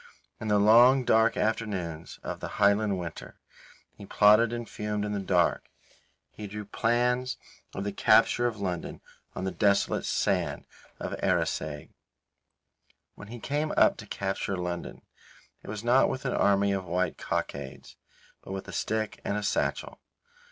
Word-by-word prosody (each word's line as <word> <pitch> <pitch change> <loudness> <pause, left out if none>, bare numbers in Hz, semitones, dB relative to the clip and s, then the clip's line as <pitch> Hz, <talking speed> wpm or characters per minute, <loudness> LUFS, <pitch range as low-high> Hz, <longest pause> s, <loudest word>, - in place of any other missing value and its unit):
In 110 - -5
the 105 -1 +3
long, 120 +5 +6
dark 110 0 +3
afternoons 95 -7 -3
of - - -5
the - - -7
Highland 100 0 +3
winter, 85 -3 -7 0.6
he - - -12
plotted 105 +3 +5
and 120 -1 -5
fumed 105 0 -3
in 105 - -3
the 105 - -2
dark. 90 -3 +1 0.6
He 105 - -8
drew 105 +1 -7
plans 125 +4 0 0.4
of 95 - -3
the 100 - -2
capture 120 +4 +4
of 110 -3 -5
London 90 -4 -4 0.3
on 95 - -4
the 95 - -1
desolate 100 -1 +1
sand - - -1 0.3
of - - -5
Arisaig. 75 -2 -1 1.2
When 105 - -12
he 120 +2 -9
came 150 +6 -2
up - - +5
to - - -10
capture 95 0 -3
London, 90 -1 -5 0.6
it - - -15
was 105 +1 -5
not 125 +3 +4
with 130 +1 -5
an 125 - 0
army 100 0 +3
of 95 -1 -2
white 90 0 -1
cockades, 70 -2 -5 0.5
but 95 - -8
with 95 - -6
a - - -8
stick 110 -1 -2
and 100 - -2
a 105 - -3
satchel. - - -2
105 Hz, 155 wpm, -28 LUFS, 95-115 Hz, 1.2 s, long